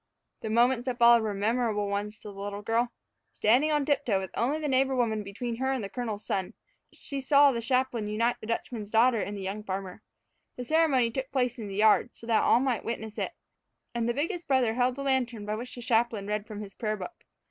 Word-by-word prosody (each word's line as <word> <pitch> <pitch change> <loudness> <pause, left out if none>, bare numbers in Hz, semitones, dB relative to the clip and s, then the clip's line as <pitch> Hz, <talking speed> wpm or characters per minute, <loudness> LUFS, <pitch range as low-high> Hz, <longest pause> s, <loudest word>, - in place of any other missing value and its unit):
The 220 - -5
moments 240 +2 +2
that 250 -2 -1
followed 235 -1 +7
were 215 -2 -2
memorable 215 0 0
ones 205 +1 -3
to 210 - -10
the - - -9
little 205 0 -5
girl. 235 +3 +1 0.4
Standing 250 +8 +3
by 305 - +2
on 295 -2 +1
tiptoe, 280 -8 +1
with 190 -1 -6
only 265 +6 0
the 310 -1 -3
neighbor 265 0 +2
woman 225 -4 +1
between 230 +4 -5
her 265 +2 0
and 260 -4 -2
the 195 - -5
colonel's 220 -4 -4
son, 190 -2 -2 0.4
she 275 -1 -6
saw 280 +1 +5
the 235 -2 -3
chaplain 250 -2 0
unite 230 +3 0
the 215 - -8
Dutchman's 230 -2 -3
daughter 230 +2 +4
and 205 0 -4
the 195 - -6
young 200 +3 -4
farmer. 190 0 -5 0.5
The 250 - -5
ceremony 275 -5 +3
took 265 +2 -4
place 250 -2 0
in 215 - -5
the 195 - -6
yard, 215 +3 +3
so - - -13
that 225 -1 +3
all - - +4
might 255 -3 0
witness 220 -2 -5
it, - - -2 0.6
and 235 -1 -1
the 240 - 0
biggest 335 +5 -2
brother 260 -5 +2
held 250 +1 +1
the 275 - -5
lantern 245 -5 0
by 210 - -2
which 240 +4 -6
the 245 - -8
chaplain 230 -3 +1
read 210 +1 -3
from 210 -1 -7
his 200 -2 -9
prayer 215 -1 -2
book. 350 - -9
235 Hz, 230 wpm, -28 LUFS, 210-255 Hz, 0.6 s, followed